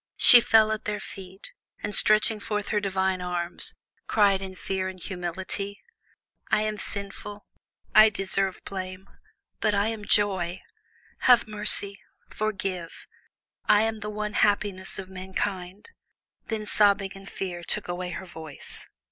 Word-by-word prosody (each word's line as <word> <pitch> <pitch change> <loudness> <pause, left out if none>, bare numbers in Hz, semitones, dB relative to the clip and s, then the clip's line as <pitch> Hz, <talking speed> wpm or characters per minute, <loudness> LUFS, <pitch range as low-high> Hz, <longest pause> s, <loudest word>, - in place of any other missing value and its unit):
She 245 - +9
fell 220 -1 +5
at 220 0 -3
their 210 -1 -2
feet, 190 -1 -10 0.3
and, 205 - -2
stretching 215 +2 +3
forth 210 0 -3
her 210 - +2
divine 190 -2 0
arms, 175 -1 -1 0.3
cried 200 -3 +4
in 190 -1 -6
fear 190 0 -2
and 190 0 -7
humility: 190 +3 -4 0.7
"I 215 0 +3
am 215 -1 -2
sinful, 200 +1 -5 0.5
I 215 +1 +9
deserve 195 -1 -1
blame, 185 0 -6 0.5
but 215 -2 +2
I 200 +2 +2
am 220 -2 -5
Joy. 190 -4 +1 0.7
Have 245 -2 +7
mercy, 210 -1 -3 0.3
forgive; 195 -5 -3 0.6
I 210 +1 +6
am 220 0 -1
the 210 0 -5
one 210 0 -3
happiness 205 -3 +1
of 190 - -6
mankind." 190 - -4 0.6
Then 220 -2 -3
sobbing 200 -2 +3
and 195 0 -11
fear 175 -2 -5
took 210 +4 -2
away 180 0 -3
her 180 +2 -6
voice. 160 -5 -7
195 Hz, 140 wpm, -27 LUFS, 185-210 Hz, 0.7 s, She